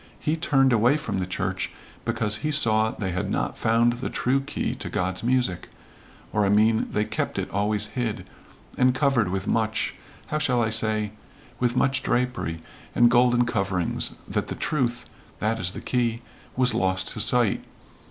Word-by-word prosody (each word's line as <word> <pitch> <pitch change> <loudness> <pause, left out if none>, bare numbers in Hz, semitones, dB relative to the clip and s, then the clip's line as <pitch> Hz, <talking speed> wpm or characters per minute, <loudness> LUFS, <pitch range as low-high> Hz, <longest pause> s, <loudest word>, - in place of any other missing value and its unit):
He 155 0 0
turned 135 -5 +3
away 120 +6 +4
from 150 -10 -3
the 90 - -2
church, 95 0 -2 0.4
because 105 0 0
he 150 - -3
saw 110 -7 +4
they 95 -4 -4
had 90 +1 -2
not - - -1
found 115 +1 +2
the 120 +2 -4
true 130 +2 +1
key 140 +2 -3
to - - -6
God's 95 0 -2
music 120 -8 0 0.6
or 105 - +2
I 100 - +2
mean 110 +2 +3
they 105 +1 0
kept - - -3
it - - -3
always 105 +1 0
hid, 120 -4 -3 0.5
and 125 0 +4
covered 130 -8 +2
with 95 +1 -2
much 110 0 0 0.3
how 155 - -2
shall 125 -5 +2
I 110 - 0
say 110 -1 +1 0.5
with 125 -1 +1
much 135 +1 +2
drapery 125 -10 -1 0.4
and 120 0 +5
golden 120 0 +4
coverings, 100 -6 -1
that - - -2
the - - -4
truth 120 -5 -1 0.3
that 110 +1 -1
is 90 -1 -1
the - - -7
key 120 -2 -1 0.3
was 125 -2 +3
lost 95 -4 0
to - - -5
sight. - - +2
115 Hz, 170 wpm, -25 LUFS, 105-125 Hz, 0.6 s, and